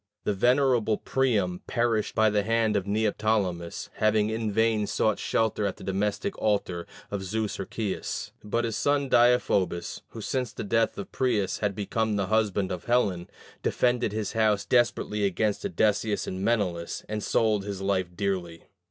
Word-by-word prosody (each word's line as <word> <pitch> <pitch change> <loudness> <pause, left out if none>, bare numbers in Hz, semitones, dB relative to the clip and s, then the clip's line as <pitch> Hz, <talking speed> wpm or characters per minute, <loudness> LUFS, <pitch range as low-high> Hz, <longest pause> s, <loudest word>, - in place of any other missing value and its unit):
The 105 - 0
venerable 120 0 +3
Priam 105 -9 0
perished 115 -3 0
by 110 -1 +4
the 105 0 +2
hand 110 0 +1
of 100 -1 0
Neoptolemus, 105 -5 -1
having 110 0 +2
in 110 -1 -2
vain 110 0 +2
sought 110 - +1
shelter 110 -2 0
at 95 - -4
the - - -11
domestic 105 - -1
altar 95 -5 0 0.2
of 100 -1 -2
Zeus 105 +2 -2
Herceius. 105 -4 -4
But 115 +3 -1
his 115 -2 -2
son 140 -1 +1
Deiphobus, 120 -8 +2
who 115 - -10
since 125 +2 -2
the - - -5
death 115 +2 +1
of 100 - -6
Paris 115 -7 0
had 105 -2 -1
become 110 +1 -1
the 100 -1 0
husband 100 -3 +1
of 90 -1 -5
Helen, 100 -8 +1 0.3
defended 120 -3 +1
his 105 -1 -3
house 110 -3 +2
desperately 120 -4 +1
against 100 +2 0
Odysseus 110 - +1
and 95 0 -5
Menelaus, 95 -7 -1
and 105 0 -3
sold 105 -1 +1
his 100 -1 -5
life 95 -2 0
dearly. 90 -4 -2
105 Hz, 160 wpm, -27 LUFS, 100-115 Hz, 0.3 s, by